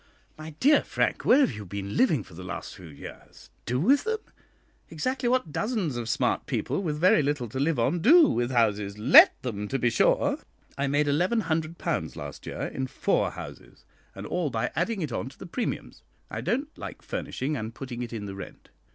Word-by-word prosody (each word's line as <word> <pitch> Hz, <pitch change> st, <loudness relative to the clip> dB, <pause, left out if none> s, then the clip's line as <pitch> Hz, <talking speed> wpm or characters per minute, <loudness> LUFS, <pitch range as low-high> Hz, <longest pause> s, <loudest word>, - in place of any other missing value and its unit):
"My 155 Hz, 0 st, -9 dB
dear 290 Hz, -, +5 dB
Frank, -, -, -1 dB
where 270 Hz, +4 st, +6 dB
have -, -, +3 dB
you 105 Hz, -1 st, -7 dB
been 100 Hz, +1 st, -6 dB
living 155 Hz, -, +3 dB
for 95 Hz, -, -17 dB
the 90 Hz, +3 st, -9 dB
last 95 Hz, -, -6 dB
few 90 Hz, -2 st, -12 dB
years? 70 Hz, -3 st, -12 dB, 0.2 s
Do 125 Hz, +2 st, 0 dB
with 270 Hz, -, +4 dB
them? 445 Hz, 0 st, -1 dB, 0.7 s
Exactly 245 Hz, -, -1 dB
what 250 Hz, -11 st, +1 dB
dozens 205 Hz, -, -1 dB
of 120 Hz, -1 st, -4 dB
smart 125 Hz, 0 st, 0 dB
people, 125 Hz, -, -1 dB
with 155 Hz, -6 st, -2 dB
very 170 Hz, 0 st, +5 dB
little 145 Hz, -3 st, -1 dB
to 130 Hz, +5 st, -5 dB
live 150 Hz, +1 st, +1 dB
on, 120 Hz, +9 st, +1 dB
do 310 Hz, -, +7 dB
with 120 Hz, -, 0 dB
houses 105 Hz, -5 st, +1 dB
let 115 Hz, +7 st, +7 dB
them, 105 Hz, -5 st, -3 dB
to 135 Hz, -, -1 dB
be 120 Hz, -2 st, +1 dB
sure. 110 Hz, -, +2 dB, 0.4 s
I 140 Hz, 0 st, -1 dB
made 145 Hz, +2 st, +2 dB
£1100 165 Hz, 0 st, -1 dB
last -, -, -8 dB
year -, -, -5 dB
in 130 Hz, 0 st, -3 dB
four -, -, 0 dB
houses, -, -, -11 dB, 0.3 s
and 100 Hz, +1 st, -7 dB
all 175 Hz, +4 st, -1 dB
by 120 Hz, 0 st, -2 dB
adding 190 Hz, +3 st, -1 dB
it 150 Hz, -, -4 dB
on 115 Hz, +2 st, -3 dB
to 135 Hz, -, -18 dB
the -, -, -9 dB
premiums. 230 Hz, +7 st, -4 dB, 0.3 s
I -, -, -4 dB
don't 280 Hz, +6 st, -2 dB
like -, -, -8 dB
furnishing 145 Hz, +4 st, -3 dB
and 110 Hz, -3 st, -4 dB
putting 125 Hz, -3 st, -6 dB
it 120 Hz, -, -5 dB
in 110 Hz, -3 st, -5 dB
the 100 Hz, -, -6 dB
rent. 100 Hz, -, -10 dB
140 Hz, 200 wpm, -27 LUFS, 115-180 Hz, 0.7 s, do